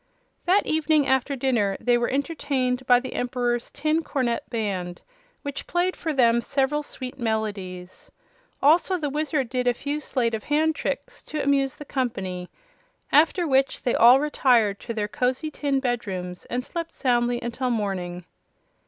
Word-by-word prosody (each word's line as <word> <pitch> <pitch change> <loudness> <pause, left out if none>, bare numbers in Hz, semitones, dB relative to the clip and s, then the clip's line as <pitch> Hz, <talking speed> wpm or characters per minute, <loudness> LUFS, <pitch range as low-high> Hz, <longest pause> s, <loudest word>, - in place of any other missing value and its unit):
That 375 +3 +3
evening 310 -2 +2
after 265 +2 +1
dinner 235 -7 +1
they 245 +1 +3
were 240 0 +1
entertained 265 -3 -1
by 245 -1 +6
the 260 - -7
Emperor's 245 -1 -1
Tin 310 +3 0
Cornet 255 -7 -2
Band, 195 -6 -3 0.4
which 285 -1 -5
played 355 +1 0
for 325 - -3
them 235 -4 +4
several 275 +4 0
sweet 275 -2 -8
melodies. 200 -6 -4 0.5
Also 340 +6 +4
the 295 -4 -3
Wizard 300 -2 -1
did 250 0 -1
a 245 - +3
few 290 +4 -3
sleight 245 -5 -1
of 220 -2 -4
hand 310 +2 +2
tricks - - -4
to 305 -1 -3
amuse 275 -1 +2
the 295 - -10
company; 195 -10 -3 0.6
after 330 +4 +4
which 270 -1 +1
they 245 - +1
all 245 +3 +7
retired 245 -8 +2
to 230 - -5
their 210 -2 -1
cozy 255 +7 -1
tin 280 -2 0
bedrooms 195 -9 -3
and 250 +1 -3
slept 335 -1 -5
soundly 240 -2 +1
until 240 +2 -3
morning. 185 -6 -2
255 Hz, 155 wpm, -25 LUFS, 230-290 Hz, 0.6 s, all